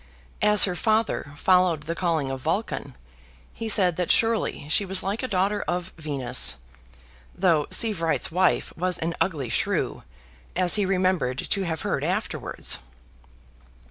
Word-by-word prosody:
As 210 0 +6
her 185 - +3
father 215 -8 0
followed 180 -2 +3
the 165 +2 -3
calling 165 -6 -1
of 135 -1 -5
Vulcan, 170 - -3 0.6
he 225 -1 -5
said 185 -5 +4
that 180 -2 -2
surely 225 -9 +1
she 165 +6 +3
was 190 -1 0
like 200 +4 -2
a 255 - -2
daughter 200 0 0
of 180 +1 -3
Venus, 135 - 0 0.8
though 165 -6 +2
Sievewright's 185 -10 0
wife 185 +2 +1
was 180 +1 -1
an 165 +1 -2
ugly 145 -10 -1
shrew, - - -1 0.5
as 180 -1 +1
he 205 -3 +3
remembered 185 -9 0
to 195 - -1
have 160 -2 -3
heard - - -2
afterwards. - - -1
180 Hz, 140 wpm, -25 LUFS, 160-195 Hz, 0.8 s, As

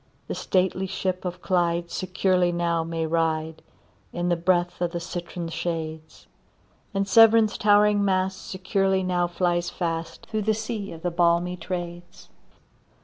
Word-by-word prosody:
The - - -3
stately 190 0 0
ship 185 -1 -3
of 180 0 -5
Clyde 170 -2 0
securely 185 -1 +1
now 170 -1 0
may 165 0 -2
ride, 160 -1 -1 0.5
In 175 0 -2
the 175 - +3
breath 175 +1 0
of 175 0 -1
the 170 - -2
citron 175 0 -5
shades; 160 -2 -5 0.7
And 195 -1 -1
Severn's 225 +1 +6
towering 205 0 +4
mast 190 -1 -1
securely 190 0 0
now 180 -1 +1
flies 175 0 0
fast, 165 -2 -4
Through 215 -1 -2
the 215 +1 +1
sea 215 -2 -4
of 165 -1 -10
the 175 - 0
balmy 170 +1 +2
Trades. 175 -1 -7
175 Hz, 145 wpm, -25 LUFS, 170-190 Hz, 0.7 s, Severn's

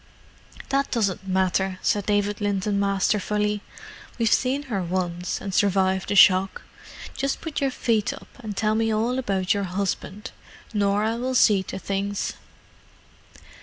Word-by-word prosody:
"That 275 0 +1
doesn't 200 -5 -1
matter," 190 0 +1
said 205 -1 +1
David 205 0 0
Linton 205 0 0
masterfully. 210 +1 0 0.6
"We've 230 -2 +2
seen 270 +3 +1
her 230 -9 -3
once, 180 0 -2
and 195 - -6
survived 190 -1 +2
the 205 - 0
shock. 190 0 +5 0.5
Just 275 0 -1
put 320 -2 -4
your 275 - +2
feet 225 -4 0
up, - - -10
and 215 -5 -6
tell 215 0 +1
me 225 0 +1
all 230 +4 0
about 195 -6 0
your 200 -1 -1
husband—Norah 200 +2 -2
will 255 +2 -2
see 210 -5 +5
to 190 - -6
things." 200 +1 -2
205 Hz, 135 wpm, -24 LUFS, 190-220 Hz, 0.6 s, shock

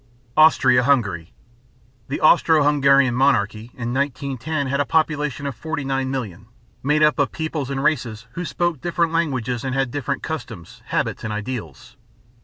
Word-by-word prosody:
AUSTRIA 135 -6 +5
HUNGARY. 105 - 0 0.8
The 140 - -4
Austro 160 -1 +5
Hungarian 140 -3 +4
Monarchy 115 -5 +1
in 120 -1 -4
1910 140 +2 -2
had 140 +1 -1
a - - +3
population 150 0 0
of 140 - -2
49,000,000, 135 - -3 0.4
made 150 +3 +2
up 150 0 +3
of 145 - +1
peoples 155 -4 -4
and 135 0 -2
races 120 -8 -1
who 170 +8 -5
spoke 175 -3 -2
different 170 -1 0
languages 130 -8 -1
and 130 -1 -2
had 135 -2 0
different 140 0 -3
customs, 115 - -7
habits, - - -2
and 110 - -3
ideals. 105 - -6
135 Hz, 145 wpm, -21 LUFS, 120-150 Hz, 0.8 s, AUSTRIA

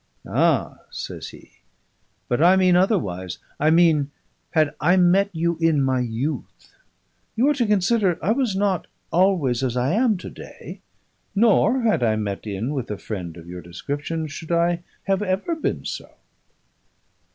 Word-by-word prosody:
"Ah!" - - +1
says - - -6
he, - - -14 0.8
"but 125 +4 0
I 180 +3 +6
mean 185 -1 +4
otherwise. 100 - 0 0.2
I 155 - +3
mean, 160 -4 +4 0.4
had 155 -3 +2
I 175 +4 +4
met 185 +3 +4
you 170 -1 -1
in 160 -4 +3
my 130 -1 +1
youth. 125 +5 -4 0.6
You 240 +5 +3
are - - +4
to 250 -5 0
consider 200 -2 +2
I 195 - 0
was 240 -4 0
not 195 -3 0 0.2
always 170 -9 +2
as 125 -2 -1
I 125 +6 +1
am 225 -1 +2
to - - -8
day; - - -11 0.5
nor 230 +3 +4
(had 220 - +2
I 110 -2 +2
met 105 -1 -4
in 105 +7 -3
with 130 -4 -4
a 105 - -3
friend 90 -7 -6
of 85 - -11
your 90 0 -7
description) 145 - -4
should 155 +2 -8
I 170 0 +2 0.2
have 195 0 0
ever 200 - -1
been 315 - -3
so." - - -5
165 Hz, 160 wpm, -23 LUFS, 125-195 Hz, 0.8 s, I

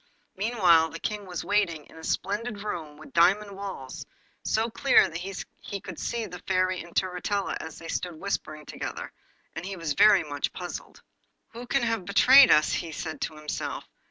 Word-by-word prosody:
Meanwhile 185 -6 +4
the 165 +2 -8
King 210 +1 -4
was 180 -2 -5
waiting 180 -7 +1
in - - -18
a 160 - -12
splendid 205 +5 -2
room 160 -8 -5
with 155 - -14
diamond 200 +5 +4
walls, 195 -10 -7 0.4
so 220 +1 +1
clear 235 +4 +4
that 165 +1 -6
he 195 +1 -7
could 190 -3 -9
see 235 -1 -2
the 180 -3 -8
Fairy 185 -1 +1
and 170 0 -13
Turritella 190 +2 -1
as 160 -1 -8
they 165 - -9
stood 175 0 -3
whispering 155 -6 -4
together, - - -6 0.4
and - - -5
he 195 +1 -5
was 165 -4 -2
very 205 +2 +6
much 145 -2 -3
puzzled. 180 -1 -7 0.5
'Who 240 +2 -9
can 275 0 +1
have 225 -5 -1
betrayed 255 +7 +8
us?' 150 - +5
he 165 - -2
said 160 0 -6
to 155 - -3
himself. 150 0 -4
185 Hz, 180 wpm, -27 LUFS, 165-210 Hz, 0.5 s, betrayed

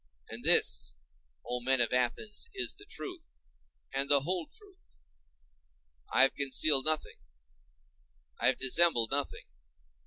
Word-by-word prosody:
And - - -9
this, - - +3 0.5
O 125 - -4
men 130 +1 0
of 120 0 0
Athens, 125 - -2
is 385 - -2
the 405 - -16
truth 360 -4 -9 0.6
and 135 +1 -1
the 140 -1 +4
whole 175 +3 -3
truth; 400 -3 -15 1.3
I - - +4
have 135 - +3
concealed 140 0 +3
nothing, 155 -1 -1 1.2
I - - +1
have - - +2
dissembled 130 -4 +2
nothing. 140 0 -4
145 Hz, 125 wpm, -30 LUFS, 130-205 Hz, 1.3 s, the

